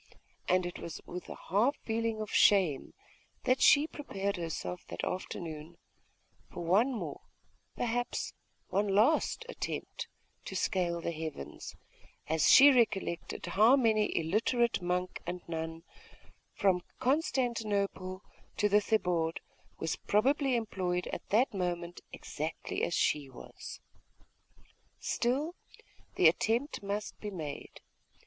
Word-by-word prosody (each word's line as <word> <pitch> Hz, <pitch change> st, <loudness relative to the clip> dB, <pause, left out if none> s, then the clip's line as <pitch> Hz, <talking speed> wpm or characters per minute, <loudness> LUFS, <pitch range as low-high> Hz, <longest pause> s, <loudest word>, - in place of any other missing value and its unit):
And 185 Hz, 0 st, +3 dB
it 175 Hz, -, -5 dB
was 170 Hz, -, -6 dB
with 180 Hz, +1 st, -7 dB
a -, -, -7 dB
half 225 Hz, -, +3 dB
feeling 225 Hz, -1 st, -1 dB
of 215 Hz, -, -5 dB
shame 180 Hz, -9 st, +4 dB, 0.5 s
that 255 Hz, 0 st, +2 dB
she 290 Hz, +1 st, +7 dB
prepared 200 Hz, -11 st, -3 dB
herself 160 Hz, -, -4 dB
that 85 Hz, -, -6 dB
afternoon 165 Hz, -3 st, -5 dB, 0.7 s
for 175 Hz, -, -6 dB
one 210 Hz, +10 st, +4 dB
more, 240 Hz, -, -5 dB, 0.5 s
perhaps 245 Hz, 0 st, -2 dB, 0.4 s
one 200 Hz, +2 st, +1 dB
last 230 Hz, -, +3 dB
attempt, -, -, -5 dB, 0.4 s
to 190 Hz, -, -6 dB
scale 175 Hz, -2 st, 0 dB
the 170 Hz, -, -2 dB
heavens, 155 Hz, -, -6 dB, 0.5 s
as 160 Hz, 0 st, +3 dB
she 285 Hz, +1 st, +10 dB
recollected 215 Hz, -9 st, 0 dB
how 220 Hz, +6 st, +5 dB
many 220 Hz, -5 st, +3 dB
an -, -, 0 dB
illiterate 230 Hz, +6 st, +1 dB
monk 180 Hz, +1 st, -2 dB
and 180 Hz, 0 st, -5 dB
nun, 165 Hz, 0 st, -4 dB, 0.7 s
from 185 Hz, -3 st, +2 dB, 0.2 s
Constantinople 220 Hz, -, 0 dB, 0.3 s
to 210 Hz, -, +3 dB
the 210 Hz, +1 st, +4 dB
Thebaid, 175 Hz, -6 st, +1 dB, 0.4 s
was 160 Hz, 0 st, -2 dB
probably 265 Hz, +5 st, +2 dB
employed 185 Hz, -6 st, -1 dB
at -, -, -6 dB
that 230 Hz, +5 st, +3 dB
moment 175 Hz, -2 st, -3 dB
exactly 155 Hz, +2 st, -4 dB
as 170 Hz, -, 0 dB
she 145 Hz, -3 st, +1 dB
was. 130 Hz, -, -10 dB, 1.2 s
Still, 275 Hz, +8 st, 0 dB, 0.6 s
the 175 Hz, -, +6 dB
attempt 230 Hz, -, +1 dB
must 205 Hz, +1 st, -4 dB
be 210 Hz, -, -5 dB
made. 155 Hz, -7 st, -7 dB
195 Hz, 120 wpm, -31 LUFS, 170-230 Hz, 1.2 s, she